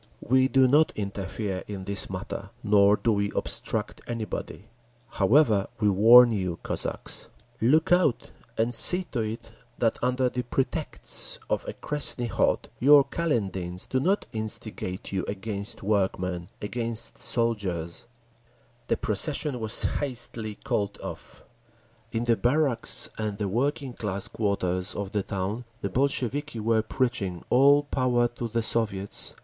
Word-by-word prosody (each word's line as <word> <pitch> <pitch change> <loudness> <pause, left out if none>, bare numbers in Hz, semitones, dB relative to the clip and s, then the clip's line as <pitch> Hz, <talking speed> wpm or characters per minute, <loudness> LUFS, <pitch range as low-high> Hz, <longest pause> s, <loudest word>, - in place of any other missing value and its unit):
We 130 +2 +3
do 135 -1 +4
not 150 +5 +4
interfere 100 -1 -4
in 100 -2 -6
this 100 +1 +1
matter, 95 +1 -6
nor 105 -1 +5
do 115 - +1
we 100 -1 0
obstruct - - -2
anybody…. 110 -5 -5 0.5
However, 110 -1 +3
we 105 -2 +3
warn 115 +5 +7
you, 90 -5 -2
Cossacks! - - -2 0.3
Look 155 +9 +3
out 175 -8 +2 0.3
and 115 +2 +1
see 180 +10 +7
to 125 - -2
it 110 +1 -4 0.3
that 115 -2 0
under 125 +1 +1
the 125 0 -2
pretext 125 +2 -1
of - - -1
a - - -4
Krestni 145 -4 0
Khod, - - +1
your 145 +3 +7
Kaledins 95 - -3
do 130 - 0
not 190 +9 +1
instigate 110 -3 -4
you 95 -1 -1
against 100 0 -5
workmen, 95 -3 -1 0.2
against 115 +1 -2
soldiers…. 100 -6 -2 0.8
The - - +1
procession 140 +5 -1
was 110 0 +1
hastily 115 -5 -2
called 100 -1 -3
off…. - - -8 0.7
In 115 0 -1
the 120 -1 +3
barracks 125 -1 +1
and 105 -2 -3
the 105 -1 -2
working 130 +5 -1
class 100 -4 -3
quarters 95 -3 -1
of 100 -1 -4
the 105 - 0
town 100 +5 -4 0.2
the 100 - -3
Bolsheviki 140 +1 0
were 110 0 +2
preaching, 110 -7 -2
"All 140 +3 +6
Power 125 -4 +1
to 120 0 -5
the 115 0 -1
Soviets!" 105 -4 -1
110 Hz, 135 wpm, -26 LUFS, 100-125 Hz, 0.8 s, warn